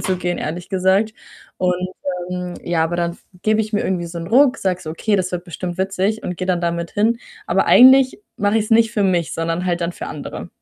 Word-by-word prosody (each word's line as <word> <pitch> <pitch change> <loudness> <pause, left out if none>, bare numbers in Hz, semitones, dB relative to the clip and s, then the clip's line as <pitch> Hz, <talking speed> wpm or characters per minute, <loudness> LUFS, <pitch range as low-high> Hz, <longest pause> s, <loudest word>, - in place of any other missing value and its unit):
zu 185 - 0
gehen, 175 -1 -2
ehrlich 170 +3 -5
gesagt 190 +3 +2 0.5
und, 180 -1 +2 0.6
ähm, 180 -1 -4
ja, 170 -2 +1
aber 165 +1 -2
dann 170 0 -2 0.2
gebe 215 0 +2
ich 215 0 -3
mir 210 - +1
irgendwie 180 -2 -1
so 170 0 -7
'nen 165 - -6
Ruck, 260 +4 +5
sage 185 -5 -1
so: 155 - -6
„Okay, 205 +6 0
das 185 -1 -1
wird 175 -1 -2
bestimmt 175 0 -5
witzig“, 195 +3 -1
und 180 - -4
gehe 185 - -4
dann 180 -2 +1
damit 170 -1 -2
hin. 225 +3 +1 0.3
Aber - - +1
eigentlich 260 +3 +7 0.2
mache 205 +1 +1
ich's 215 +1 -3
nicht 225 0 +4
für 210 -3 0
mich, 180 -4 +1
sondern 165 +2 -2
halt 175 -1 0
dann 170 0 -1
für - - -7
andere. - - -7
185 Hz, 225 wpm, -20 LUFS, 175-215 Hz, 0.6 s, eigentlich